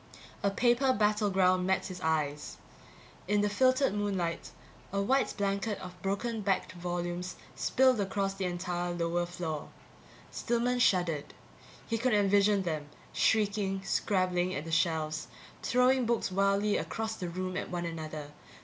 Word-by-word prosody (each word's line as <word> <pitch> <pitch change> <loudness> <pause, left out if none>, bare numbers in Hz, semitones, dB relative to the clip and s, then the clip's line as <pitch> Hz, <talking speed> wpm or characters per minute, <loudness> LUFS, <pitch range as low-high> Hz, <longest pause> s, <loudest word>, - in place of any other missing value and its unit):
A 200 - +2
paper 240 +5 +3
battleground 195 -4 +2
met 190 0 +1
his 185 -2 -7
eyes. 150 -3 -1 0.7
In 205 +1 +2
the 210 - +2
filtered 255 +2 +3
moonlight, 195 -5 -2 0.4
a 200 - -1
white 260 +7 +1
blanket 200 +1 -1
of 180 0 -10
broken 215 +4 -2
backed 195 -2 0
volumes 175 0 -4 0.2
spilled 260 -3 +3
across 195 0 -1
the 195 -1 -3
entire 175 0 -2
lower 175 0 0
floor. 165 -4 -4 0.6
Stillman 240 +1 0
shuddered; 175 -9 +1 0.5
he 230 -1 -1
could 240 -1 +2
envision 200 0 +4
them, 155 -4 -3 0.2
shrieking, 205 -3 +1
scrabbling 185 -2 0
at 145 - -4
the 165 - -6
shelves, 160 -2 0 0.3
throwing 250 0 +3
books 235 -4 0
wildly 200 +2 +2
across 220 0 -3
the 180 -4 -4
room 185 +1 -4
at - - -3
one 175 -1 -3
another. 155 -3 -6
195 Hz, 140 wpm, -30 LUFS, 175-210 Hz, 0.7 s, envision